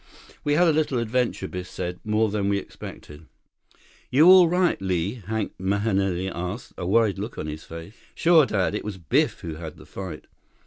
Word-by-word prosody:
"We 145 - +1
had 175 +3 +4
a 160 - +4
little 150 -4 +1
adventure," 115 -3 -1
Biff 90 0 -6
said. 90 0 -5
"More 110 0 +1
than 100 -1 0
we 100 - +2
expected." 75 -5 -10 0.8
"You're 145 +5 +5
all 180 -2 +8
right, 180 - +1
Li?" 95 +5 -1
Hank 110 -1 -2
Mahenili 95 -1 0
asked, 90 +5 -5
a 90 - -5
worried 105 -1 +2
look 110 +4 -5
on - - -4
his 75 +1 -6
face. 85 +4 -9 0.2
"Sure, 165 -4 +5
Dad. 95 -2 0
It 105 - -3
was 105 -2 -5
Biff 85 -6 0
who 80 -2 -6
had 80 -2 -8
the - - -14
fight." 90 -6 -7
100 Hz, 185 wpm, -25 LUFS, 90-120 Hz, 0.8 s, all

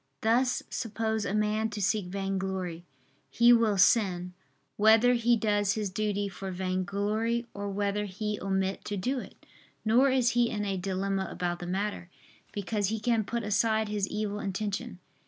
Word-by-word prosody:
Thus 245 +3 +2
suppose 220 -3 -2
a 200 - -1
man 215 +1 +1
to 210 -1 -6
seek 205 -1 0
vainglory, 190 -2 -3 0.4
he 240 +1 +6
will 225 -4 +3
sin, 180 -3 +3 0.4
whether 220 +3 +5
he 240 0 +3
does 205 -2 +1
his 210 -3 -2
duty 205 0 -1
for 195 0 -6
vainglory 200 +5 -1
or 200 0 -4
whether 205 +1 -1
he 210 +2 -4
omit 190 0 -1
to 205 - -3
do 255 +8 -1
it. - - -12 0.4
Nor 245 +5 +5
is 255 -2 +3
he 240 -1 +2
in 210 -1 -2
a 195 -1 -1
dilemma 190 +1 -2
about 175 -1 -3
the 175 - -6
matter: 195 -1 -3 0.4
because 205 0 -1
he 220 +2 -2
can 225 0 +1
put 235 +3 -3
aside 215 +1 +1
his 205 -2 -1
evil 210 -1 -3
intention. 205 +3 -3
205 Hz, 160 wpm, -29 LUFS, 195-220 Hz, 0.4 s, he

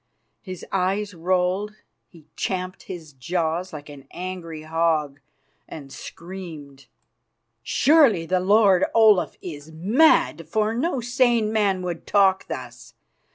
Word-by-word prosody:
His 185 -3 -8
eyes 195 +2 -1
rolled; 185 +4 -1 0.3
he 165 -3 -18
champed 185 -1 -3
his 165 -5 -8
jaws 165 +6 -2
like 145 -2 -9
an 140 -2 -12
angry 175 -4 -7
hog, 155 -3 0 0.5
and 140 -3 -10
screamed: 160 -8 -10 0.7
"Surely 260 - +4
the 185 +2 +1
lord 195 -1 +4
Olaf 215 -5 +4
is 155 -2 -8
mad, 180 - +2
for 215 +3 0
no 270 +2 -1
sane 240 -3 +1
man 200 -4 +1
would 175 -2 -5
talk 195 -2 +3
thus. 120 -1 -8
180 Hz, 115 wpm, -23 LUFS, 160-205 Hz, 0.7 s, Surely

